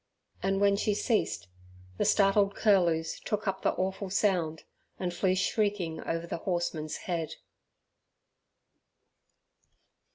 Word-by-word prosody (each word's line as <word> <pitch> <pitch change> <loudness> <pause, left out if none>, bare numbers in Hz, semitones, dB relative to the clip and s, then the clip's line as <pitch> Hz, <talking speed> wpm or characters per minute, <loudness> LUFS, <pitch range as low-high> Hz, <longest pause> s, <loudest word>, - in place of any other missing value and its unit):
And 195 0 +1
when 200 0 +4
she 210 0 +1
ceased, 220 +1 0 0.5
the - - +2
startled 200 0 +4
curlews 170 -6 +2
took 210 0 -3
up 190 0 -1
the - - +2
awful 190 +1 -2
sound, 180 -5 +1 0.3
and 180 -2 -2
flew 185 +1 +1
shrieking 190 -4 0
over 165 0 -2
the 170 - -4
horseman's 165 -3 -2
head. 170 -3 -2
190 Hz, 110 wpm, -29 LUFS, 170-200 Hz, 0.5 s, when